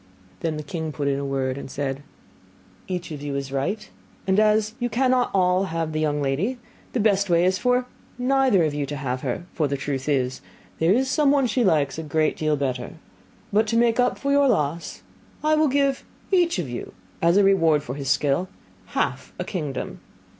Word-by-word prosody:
Then 160 -2 -2
the 150 - -5
king 160 +1 -4
put 145 -1 -3
in 140 0 +1
a - - -3
word, 135 -1 -1
and - - -8
said, 135 0 -3 0.9
'Each 180 -2 -4
of 150 -2 -6
you 145 -1 -4
is 140 -1 -4
right; 140 +11 -2 0.4
and 190 +1 +3
as 215 0 +3
all 245 - 0
cannot 215 -7 +2
have 165 -1 -2
the 155 - -2
young 150 -2 0
lady, 165 - 0 0.4
the 250 - 0
best 200 -2 +2
way 170 0 +4
is 185 +1 +2
for 250 0 +2 0.3
neither 255 -6 +3
of 155 -2 0
you 145 -1 -2
to 145 - -4
have 130 -2 -3
her: 175 - -3
for 155 -4 +1
the 140 0 -2
truth 135 0 -3
is, 130 -3 0 0.4
there 165 +2 +3
is 260 +6 +3
somebody 285 -1 +3
she 240 +2 +1
likes 160 -6 +2
a - - -2
great 155 0 0
deal 155 -1 +1
better. 130 -3 -3 0.6
But 215 +2 +3
to 230 +1 +1
make 235 0 +3
up 245 - +2
for 280 - -1
your 280 0 +4
loss, 155 - -1 0.4
I 310 0 +3
will 310 0 +4
give 275 0 +1 0.3
each 350 - +3
of 175 -6 -2
you, 120 -1 -6 0.3
as 170 +3 +4
a 205 - +6
reward 165 -7 +4
for 125 - -5
his 135 -1 -4
skill, 145 +5 +1 0.5
half - - -1
a - - -2
kingdom. 150 -9 -4
170 Hz, 200 wpm, -24 LUFS, 140-225 Hz, 0.9 s, a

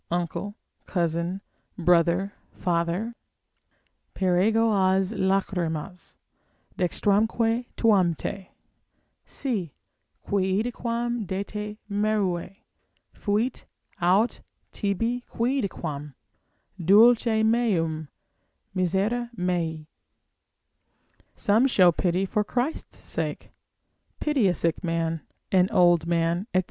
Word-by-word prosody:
uncle, 175 +4 -3 0.3
cousin, 170 +1 -1 0.4
brother, 175 +3 +2 0.2
father, 175 +6 -1 1.0
———Per 180 -2 +2
ego 225 +2 +3
has 190 0 +2
lachrymas, 185 -3 -2 0.6
dextramque 225 +6 +1
tuam 190 -7 +3
te, 195 +4 -6 0.8
Si 195 - -3 0.5
quidquam 230 +3 -1
de 190 +2 -2
te 210 +1 -6
merui, 200 -3 -1 0.5
fuit 220 +5 -1 0.4
aut 190 +7 +2 0.3
tibi 230 +4 -1
quidquam 175 - -2 0.7
Dulce 220 +4 +5
meum, 175 -10 +1 0.7
misere 195 +6 0
mei. 170 -3 -1 1.5
Show 220 +6 +3
some 185 -9 +5
pity 180 +3 0
for 210 +2 0
Christ's 250 +8 -3
sake, - - -4 0.7
pity 285 -9 +2
a 180 - +2
sick 165 -1 0
man, 165 -1 -1 0.3
an 185 0 +4
old 175 -6 +4
man, 170 +3 0
&c. - - +6
195 Hz, 85 wpm, -26 LUFS, 175-220 Hz, 1.5 s, c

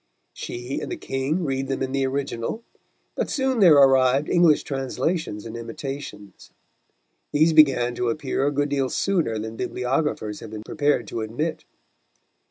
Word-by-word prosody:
She 120 +3 -5
and - - -6
the 360 - -3
King 140 - -2
read 135 -2 -2
them 135 0 -2
in 130 - -3
the 135 0 0
original, 135 - -3 0.5
but - - -2
soon 265 -3 0
there 175 -7 +7
arrived 135 0 +4
English 170 -4 +4
translations 135 - -3
and 115 0 -7
imitations. 115 -3 -8 0.8
These 155 +2 +3
began 135 -6 +5
to 120 0 -1
appear 140 +1 -1
a - - +1
good 145 0 0
deal 135 -2 0
sooner 170 - 0
than 110 +1 -6
bibliographers 125 -4 -2
have 115 - -9
been 110 0 -7
prepared 145 -2 0
to 115 - -4
admit. 125 +10 -3
135 Hz, 155 wpm, -24 LUFS, 120-150 Hz, 0.8 s, there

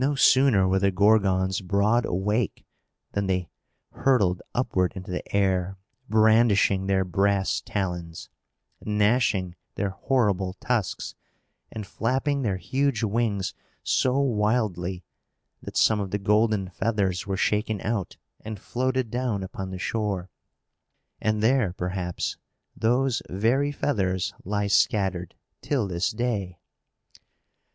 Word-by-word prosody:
No 145 +2 +1
sooner 130 -8 +5
were 95 +1 +2
the 100 0 +3
Gorgons 95 -1 +2
broad 100 +5 +2
awake 105 +5 -1 0.5
than 100 -1 -1
they 90 -2 -1 0.4
hurtled 100 -10 +2
upward 95 -7 +1
into 95 0 -7
the 90 - -2
air, 95 -1 +1 0.3
brandishing 110 -3 +4
their 95 -1 +2
brass 95 +2 +1
talons, 85 -4 -4 0.6
gnashing 105 -3 +1 0.2
their 100 -2 -1
horrible 100 -5 0
tusks, 110 0 -2 0.6
and 110 -2 -6
flapping 130 +8 -1
their 100 -7 0
huge 135 +2 0
wings 105 -3 0 0.3
so 130 +1 +2
wildly, 105 -8 0 0.6
that - - -6
some 110 -1 +4
of 100 -2 -3
the 100 - -1
golden 105 -1 +1
feathers 100 -3 -1
were 95 -1 -1
shaken 105 +2 0
out, 105 -3 -3 0.3
and 110 -1 -6
floated 130 +1 -1
down 120 -5 -1
upon 95 0 -6
the 95 - -5
shore. 100 -3 -2 0.9
And 110 0 0
there, 115 -6 +3
perhaps, 90 -1 -3 0.4
those 125 +2 +1
very 120 +9 +1
feathers 95 -11 -1
lie 100 +1 -1
scattered 95 -4 +1 0.3
till 130 -8 0
this 85 -1 -1
day. 105 -6 -2
100 Hz, 120 wpm, -25 LUFS, 95-115 Hz, 0.9 s, sooner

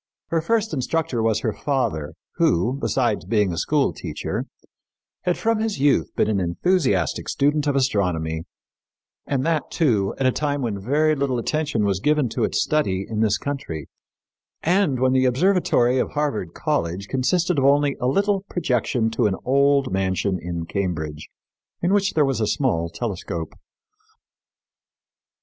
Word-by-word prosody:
Her 165 -1 +1
first 220 +5 0
instructor 135 -3 -1
was 110 -1 +1
her 110 -4 -1
father, 125 - -2 0.2
who, 90 +9 +2
besides 125 - 0
being 105 -1 +1
a - - -5
school - - +1
teacher, - - -4 0.8
had 180 - +1
from 225 -1 +1
his 220 -1 -1
youth 140 0 +3
been - - +2
an 105 -2 +1
enthusiastic 95 - 0
student 145 +1 +1
of 145 - +1
astronomy, 90 -11 0 0.8
and 135 -2 0
that, 160 -4 0
too, 110 - +1
at 135 - -1
a 130 - +4
time 145 0 -1
when 105 -5 -3
very 150 +8 +2
little 140 -3 0
attention 130 -3 -1
was 100 -2 0
given 150 +1 +2
to - - -2
its - - 0
study 100 -11 0
in 110 -1 -3
this 110 -2 +2
country, 95 - -5 0.7
and 175 -6 +2
when 130 0 +3
the 130 0 +3
observatory 130 -3 +2
of - - -2
Harvard 140 - -2
College 90 +4 -2
consisted 165 - +1
of 135 - +1
only 140 0 +3
a 125 - +1
little 200 +7 +1
projection 125 -7 0
to 115 0 +2
an 95 - 0
old 140 -2 +3
mansion 95 0 0
in 85 -1 -4
Cambridge, 80 -6 -3 0.5
in 175 +3 +1
which 200 -1 +2
there 150 -2 +3
was 135 -4 -1
a 110 - +1
small 105 - 0
telescope. 85 -3 -4
130 Hz, 155 wpm, -23 LUFS, 100-150 Hz, 0.8 s, a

